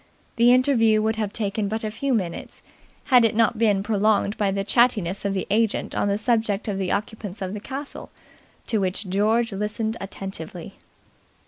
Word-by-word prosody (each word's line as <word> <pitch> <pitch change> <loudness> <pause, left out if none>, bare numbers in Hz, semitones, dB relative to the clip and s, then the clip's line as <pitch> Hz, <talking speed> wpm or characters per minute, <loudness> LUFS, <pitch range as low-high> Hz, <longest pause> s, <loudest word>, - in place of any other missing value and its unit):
The 235 +1 +6
interview 245 -4 +4
would 220 0 0
have 210 -2 -2
taken 210 -1 -2
but 220 +2 -3
a 215 - -2
few 275 +5 -2
minutes, 180 -6 -5 0.4
had 250 -3 +5
it 225 - +2
not 225 0 +2
been 205 -4 +2
prolonged 210 -1 +1
by 205 -2 0
the 195 0 -1
chattiness 205 -4 +2
of 200 0 0
the 190 - -2
agent 220 0 0
on - - 0
the 200 0 +1
subject 220 -3 0
of 200 -2 -2
the 190 -2 -1
occupants 205 -1 -4
of 190 -1 -4
the 210 - -5
castle, 275 +6 -7 0.6
to 220 - 0
which 190 +1 -2
George 220 +5 +1
listened 215 +3 -3
attentively. 190 -4 -7
210 Hz, 180 wpm, -23 LUFS, 195-225 Hz, 0.6 s, The